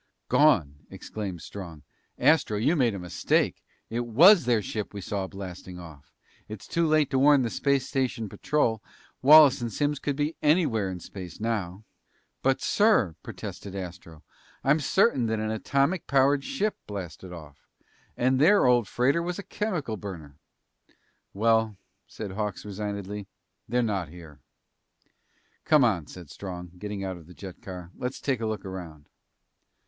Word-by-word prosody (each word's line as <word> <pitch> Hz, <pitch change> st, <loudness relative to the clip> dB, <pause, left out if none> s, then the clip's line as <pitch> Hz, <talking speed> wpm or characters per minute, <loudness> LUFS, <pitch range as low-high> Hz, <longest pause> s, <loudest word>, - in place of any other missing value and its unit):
"Gone!" 90 Hz, -, +3 dB
exclaimed 95 Hz, -6 st, -6 dB
Strong. 85 Hz, -7 st, -9 dB, 0.3 s
"Astro, 145 Hz, -9 st, +3 dB
you 140 Hz, +11 st, +2 dB
made 120 Hz, -8 st, +2 dB
a -, -, -4 dB
mistake! 90 Hz, -1 st, 0 dB, 0.3 s
It 115 Hz, -, -1 dB
was 170 Hz, -, +7 dB
their 115 Hz, -4 st, +2 dB
ship 105 Hz, 0 st, -5 dB
we -, -, -4 dB
saw 95 Hz, 0 st, -3 dB
blasting 95 Hz, -2 st, -8 dB
off. 80 Hz, -5 st, -12 dB, 0.4 s
It's 110 Hz, -2 st, -8 dB
too 170 Hz, -1 st, +1 dB
late 155 Hz, -2 st, +2 dB
to 130 Hz, -, +2 dB
warn 140 Hz, -1 st, +5 dB
the 115 Hz, -, -2 dB
space 140 Hz, -2 st, +1 dB
station 130 Hz, -5 st, -1 dB
patrol. 115 Hz, -1 st, 0 dB, 0.4 s
Wallace 145 Hz, -1 st, +8 dB
and 120 Hz, -1 st, -3 dB
Simms 145 Hz, +5 st, -1 dB
could 145 Hz, 0 st, -2 dB
be 150 Hz, +3 st, -1 dB
anywhere 150 Hz, -, +2 dB
in 90 Hz, -1 st, -5 dB
space 90 Hz, -1 st, -9 dB
now!" 105 Hz, -4 st, -3 dB, 0.6 s
"But, 135 Hz, 0 st, +1 dB
sir," 205 Hz, -, +3 dB
protested 100 Hz, -1 st, -8 dB
Astro, 90 Hz, -4 st, -8 dB, 0.4 s
"I'm 145 Hz, +4 st, +3 dB
certain 145 Hz, -, +2 dB
that 110 Hz, 0 st, 0 dB
an 110 Hz, 0 st, -2 dB
atomic 140 Hz, -, 0 dB
powered 140 Hz, +1 st, +3 dB
ship 215 Hz, -6 st, -1 dB
blasted 95 Hz, -2 st, -7 dB
off. 75 Hz, -5 st, -12 dB, 0.5 s
And 130 Hz, +1 st, +2 dB
their 200 Hz, +8 st, +5 dB
old 120 Hz, -3 st, +4 dB
freighter 135 Hz, +7 st, +1 dB
was 175 Hz, +1 st, -3 dB
a 200 Hz, -, -6 dB
chemical 165 Hz, -, -3 dB
burner!" 80 Hz, -8 st, -9 dB, 0.9 s
"Well," 110 Hz, 0 st, +2 dB, 0.3 s
said 105 Hz, -3 st, -7 dB
Hawks 105 Hz, 0 st, -4 dB
resignedly, 100 Hz, -1 st, -5 dB, 0.4 s
"they're 125 Hz, +2 st, +2 dB
not 100 Hz, -8 st, -2 dB
here." 80 Hz, -3 st, -13 dB, 1.2 s
"Come 150 Hz, -3 st, +5 dB
on," 95 Hz, -10 st, +1 dB
said 85 Hz, -5 st, -11 dB
Strong, 90 Hz, -2 st, -7 dB
getting 105 Hz, -1 st, -5 dB
out 95 Hz, -1 st, -4 dB
of 80 Hz, -2 st, -15 dB
the 90 Hz, -, -14 dB
jet 95 Hz, -3 st, -10 dB
car. 90 Hz, -2 st, -8 dB
"Let's 125 Hz, +1 st, -4 dB
take 130 Hz, -5 st, -1 dB
a 110 Hz, -, -1 dB
look 110 Hz, -3 st, -4 dB
around." 85 Hz, -6 st, -8 dB
110 Hz, 155 wpm, -27 LUFS, 95-140 Hz, 1.2 s, Wallace